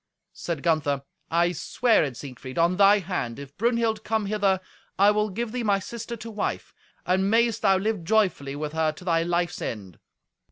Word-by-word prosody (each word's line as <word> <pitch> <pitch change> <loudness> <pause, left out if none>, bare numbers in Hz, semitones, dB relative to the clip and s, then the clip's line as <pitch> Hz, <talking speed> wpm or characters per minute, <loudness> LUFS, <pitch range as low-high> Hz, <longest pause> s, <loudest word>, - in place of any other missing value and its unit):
Said 165 -5 -4
Gunther, 145 -4 +1 0.3
"I 170 +1 +2
swear 225 +6 +2
it, 135 -5 -4
Siegfried, 130 -1 -9
on 170 +2 +3
thy 200 +1 +6
hand. 175 - -3
If 140 0 -10
Brunhild 230 -1 0
come 220 -1 0
hither, 200 -2 +1 0.4
I 200 +2 +6
will 210 0 +1
give 225 +3 -3
thee 250 +1 -2
my 205 -3 +2
sister 230 +3 -6
to 230 +1 -8
wife; 210 -1 -3 0.3
and 190 +2 +2
mayest 230 0 +2
thou 195 -2 +4
live 205 -2 -1
joyfully 180 -8 +1
with 150 +1 -4
her 160 -1 +1
to 180 - -13
thy 165 -2 +2
life's 175 +1 -1
end." 95 -7 -6
190 Hz, 185 wpm, -25 LUFS, 160-215 Hz, 0.4 s, thy